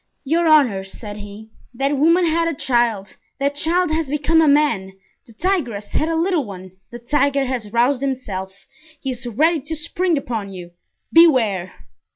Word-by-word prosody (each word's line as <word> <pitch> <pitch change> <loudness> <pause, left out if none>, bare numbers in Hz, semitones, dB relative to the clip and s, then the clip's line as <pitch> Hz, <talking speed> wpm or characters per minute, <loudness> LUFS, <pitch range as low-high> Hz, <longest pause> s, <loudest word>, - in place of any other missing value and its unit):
"Your 325 +4 +1
honors," 230 -12 +3
said 210 -2 -8
he, 205 +1 -11 0.2
"that 275 +3 0
woman 335 +5 +3
had 330 +1 +1
a 330 - -2
child; 235 -7 0 0.2
that 280 +1 0
child 335 +3 0
has 315 -2 -1
become 300 +3 +2
a 315 - +3
man; 280 -10 +2 0.3
the - - -15
tigress 245 - -2
had 310 - 0
a 330 - 0
little 335 -1 +1
one, 190 -4 -10 0.2
the 240 - -8
tiger 280 +3 +1
has 245 -5 -4
roused 245 +3 +2
himself; 195 -8 -5 0.3
he 270 - -3
is 250 0 -6
ready 310 +8 +2
to 315 +4 -5
spring 335 +2 -1
upon 225 -7 -4
you—beware!" 190 - 0
270 Hz, 165 wpm, -20 LUFS, 210-315 Hz, 0.3 s, honors